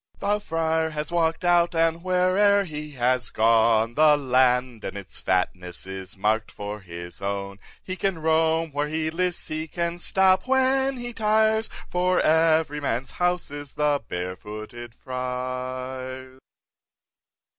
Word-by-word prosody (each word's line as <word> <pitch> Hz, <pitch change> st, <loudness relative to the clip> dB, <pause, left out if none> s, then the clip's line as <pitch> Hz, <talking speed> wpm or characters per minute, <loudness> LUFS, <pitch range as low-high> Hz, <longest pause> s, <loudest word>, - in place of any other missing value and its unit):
4. 200 Hz, -, -2 dB
The 210 Hz, -, 0 dB
Friar 160 Hz, -3 st, 0 dB
has 150 Hz, +1 st, -4 dB
walk'd 165 Hz, 0 st, 0 dB
out, 175 Hz, -1 st, +3 dB
and 165 Hz, 0 st, +2 dB
where'er 185 Hz, +3 st, +3 dB
he 150 Hz, -3 st, -7 dB
has 125 Hz, -1 st, +1 dB
gone, 115 Hz, 0 st, +3 dB
The 150 Hz, +2 st, +5 dB
land 125 Hz, -3 st, +2 dB
and 95 Hz, -, -5 dB
its 100 Hz, -1 st, -8 dB
fatness 90 Hz, -1 st, -1 dB
is 95 Hz, 0 st, -8 dB
mark'd 110 Hz, +3 st, 0 dB
for 105 Hz, +1 st, -6 dB
his 85 Hz, -2 st, -9 dB
own; 100 Hz, 0 st, -4 dB, 0.2 s
He 185 Hz, -, -5 dB
can 195 Hz, -2 st, -1 dB
roam 160 Hz, 0 st, +1 dB
where 145 Hz, +1 st, -1 dB
he 155 Hz, +1 st, -2 dB
lists, 180 Hz, +1 st, -2 dB
he 155 Hz, +1 st, -3 dB
can 170 Hz, +1 st, -3 dB
stop 190 Hz, +3 st, +3 dB
when 265 Hz, 0 st, +2 dB
he 240 Hz, 0 st, -6 dB
tires, 220 Hz, 0 st, +2 dB, 0.2 s
For 180 Hz, +1 st, +1 dB
every 160 Hz, -1 st, +3 dB
man's 130 Hz, -1 st, -2 dB
house 180 Hz, -3 st, -1 dB
is 145 Hz, -1 st, -8 dB
the 150 Hz, -1 st, +1 dB
Barefooted 105 Hz, +6 st, -6 dB
Friar's. 130 Hz, +1 st, -5 dB
150 Hz, 140 wpm, -25 LUFS, 120-175 Hz, 0.2 s, The